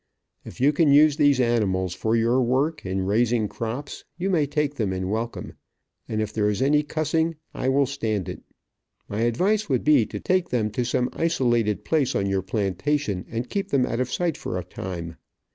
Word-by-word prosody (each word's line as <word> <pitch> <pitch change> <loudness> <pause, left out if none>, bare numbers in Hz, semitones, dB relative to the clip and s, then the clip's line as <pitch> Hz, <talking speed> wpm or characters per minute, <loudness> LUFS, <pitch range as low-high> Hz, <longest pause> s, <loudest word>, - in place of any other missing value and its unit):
If - - -11
you 140 +4 +4
can 150 -1 +3
use 150 +1 +6
these 145 -3 +4
animals 100 -7 +1
for 110 +4 0
your 115 +3 +2
work, 135 +6 0
in 95 0 -1
raising 110 +2 +2
crops, 115 +7 -5
you 190 +2 -1
may 155 -5 +2
take 150 0 -1
them 110 -9 -1
in 95 +1 -3
welcome, 115 +2 -4 0.6
and 110 -1 0
if 110 0 -6
there 105 -1 +1
is 105 - -1
any 145 +3 +3
cussing, 160 +2 -1 0.2
I 130 - -1
will 140 +1 +3
stand 110 -8 -2
it. - - -6 0.7
My 105 - -4
advice 185 - +1
would 130 -3 +1
be 145 -7 +4
to - - -6
take 185 -1 0
them 110 -4 0
to 125 +4 -1
some 125 +1 0
isolated 120 -10 +1
place 150 -5 +1
on 100 - +1
your 95 -1 0
plantation, 100 +2 -1
and 115 +2 -3
keep 200 +4 -3
them 135 -3 +2
out 115 - -3
of 125 -1 -1
sight 170 -4 -1
for 90 - -4
a 90 - -3
time. 85 -3 -6
120 Hz, 195 wpm, -24 LUFS, 105-145 Hz, 0.7 s, use